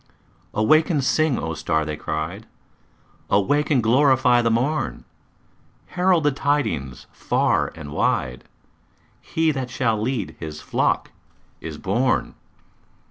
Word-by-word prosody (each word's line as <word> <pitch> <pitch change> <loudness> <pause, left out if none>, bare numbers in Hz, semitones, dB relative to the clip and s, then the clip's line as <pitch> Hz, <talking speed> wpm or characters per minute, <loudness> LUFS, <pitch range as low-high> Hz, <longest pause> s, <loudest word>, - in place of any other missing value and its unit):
"Awake 155 +10 +4
and 150 -6 +1
sing, 155 0 +2
O 80 - -3
star!" 80 0 -1
they 75 0 -3
cried. 80 +10 -5 0.8
"Awake 145 +10 +2
and 135 -6 +2
glorify 125 0 +4
the 115 - +1
morn! 130 +7 -1 0.8
Herald 180 -2 +2
the 145 - +3
tidings 135 - -1
far - - 0
and 75 -2 -9
wide 65 -3 -1 0.8
He 160 0 0
that 130 -3 -4
shall 115 -3 0
lead 115 -4 -2
His 75 -2 -7
flock - - -1 0.5
is - - -7
born!" - - 0
120 Hz, 120 wpm, -22 LUFS, -, 0.8 s, Awake